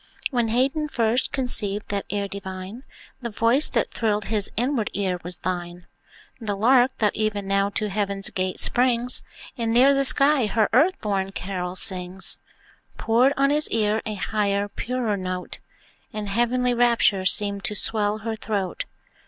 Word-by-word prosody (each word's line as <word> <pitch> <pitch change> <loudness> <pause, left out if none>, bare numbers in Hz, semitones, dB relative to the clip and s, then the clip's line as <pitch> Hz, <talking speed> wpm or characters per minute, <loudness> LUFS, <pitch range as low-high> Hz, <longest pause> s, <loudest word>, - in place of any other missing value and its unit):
When 240 -3 0
Haydn 270 +7 0
first 235 -3 -1
conceived 215 -6 +3
that 200 -1 -4
air 200 0 -3
divine, 190 +3 -8 0.4
The 235 - -5
voice 230 +7 +4
that 230 - -1
thrilled 210 -2 -2
his 210 -2 0
inward 245 -2 -1
ear 190 -3 -2
was 180 +1 -5
thine. 175 -1 -6 0.5
The 215 -4 -3
Lark, 245 +5 +2
that 210 -2 0
even 210 -2 -2
now 195 0 0
to 210 +1 -3
heaven's 200 -1 -2
gate 185 0 -3
springs, 245 0 +3 0.4
And 230 -1 -1
near 260 +4 +4
the 275 0 +1
sky 275 -2 +5
her 215 0 0
earth 320 +10 +3
born 195 -2 -2
carol 180 -2 -5
sings, 185 -2 +1 0.6
Poured 245 +5 +2
on 275 +1 +2
his 300 +1 +2
ear 215 -1 0
a 215 - -4
higher, 200 0 -2
purer 235 -1 -3
note, 185 -1 -6 0.5
And 215 -2 -6
heavenly 245 +3 0
rapture 235 -5 +2
seemed 200 0 +2
to 215 -3 +1
swell 210 0 +1
her 220 +1 -5
throat. 200 -5 -4
215 Hz, 155 wpm, -23 LUFS, 195-240 Hz, 0.6 s, sky